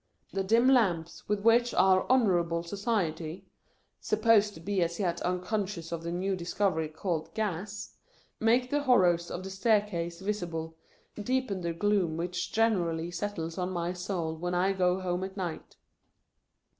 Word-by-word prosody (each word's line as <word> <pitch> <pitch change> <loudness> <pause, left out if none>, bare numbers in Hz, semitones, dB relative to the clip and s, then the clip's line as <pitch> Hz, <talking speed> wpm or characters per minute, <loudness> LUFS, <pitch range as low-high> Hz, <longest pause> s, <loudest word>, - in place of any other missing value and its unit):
The 195 - 0
dim 230 +6 +4
lamps 185 -13 +2
with 210 -1 +1
which 235 +2 +4
our 185 0 +4
Honourable 175 -9 +3
Society 175 -4 -2 0.5
(supposed 215 -3 +3
to - - -10
be 195 +2 -1
as 170 +2 -1
yet 175 -4 -1
unconscious 180 -1 -2
of 170 -1 -3
the 170 0 -4
new 190 +2 -1
discovery 170 -2 -1
called 160 0 -3
Gas) 210 0 -4 0.4
make 245 +3 +2
the 290 0 +2
horrors 180 -10 +3
of 185 - -5
the 190 - -6
staircase 190 -5 0
visible, 175 -5 -3 0.5
deepen 250 -4 -1
the 170 -1 -1
gloom 185 -3 +1
which 175 +1 -3
generally 175 -7 +1
settles 175 -2 -4
on 180 0 -1
my 175 -1 -2
soul 175 -3 -3
when 175 +2 -3
I 190 +2 +2
go 180 -1 +2
home 180 0 -2
at 190 +1 -6
night. 175 -4 -5
185 Hz, 150 wpm, -29 LUFS, 170-210 Hz, 0.5 s, dim